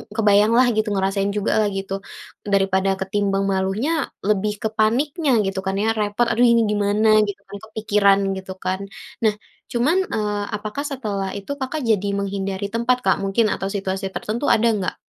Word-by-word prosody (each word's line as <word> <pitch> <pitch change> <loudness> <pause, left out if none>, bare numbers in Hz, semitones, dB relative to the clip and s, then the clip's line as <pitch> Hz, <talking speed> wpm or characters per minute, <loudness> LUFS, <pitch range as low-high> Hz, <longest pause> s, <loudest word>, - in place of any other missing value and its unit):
kebayanglah 215 +2 +4
gitu 215 0 +1
ngerasain 195 +1 0
juga 205 - 0
lah 215 - +2
gitu, 195 0 -4 0.6
daripada 195 0 +2
ketimbang 195 0 0
malunya 195 +8 0 0.3
lebih 210 0 +1
ke 220 - +1
paniknya 280 +8 +2
gitu 195 0 -2
kan 190 0 -1
ya? - - +1
Repot 210 +3 +1
aduh 235 +2 +3
ini 235 0 +4
gimana? 205 +1 +1 0.2
Gitu 205 0 -6
kan 200 +1 -8
kepikiran 210 -2 +2 0.2
gitu 190 0 -7
kan? 185 +1 0 0.5
Nah 210 - +1 0.4
cuman, 255 +9 +2 0.2
eee, 210 -1 -1
apakah 210 +6 -4
setelah 205 -8 -3
itu 200 +5 -6
Kakak 275 +4 -3
jadi 205 -2 +2
menghindari 195 0 -3
tempat 235 +2 +2
Kak? 190 - +3
Mungkin 195 +4 +2
atau 195 - -3
situasi 195 0 -2
tertentu 230 +6 -3
ada 230 +1 +2
nggak? 185 -2 -3
205 Hz, 165 wpm, -21 LUFS, 195-220 Hz, 0.6 s, kebayanglah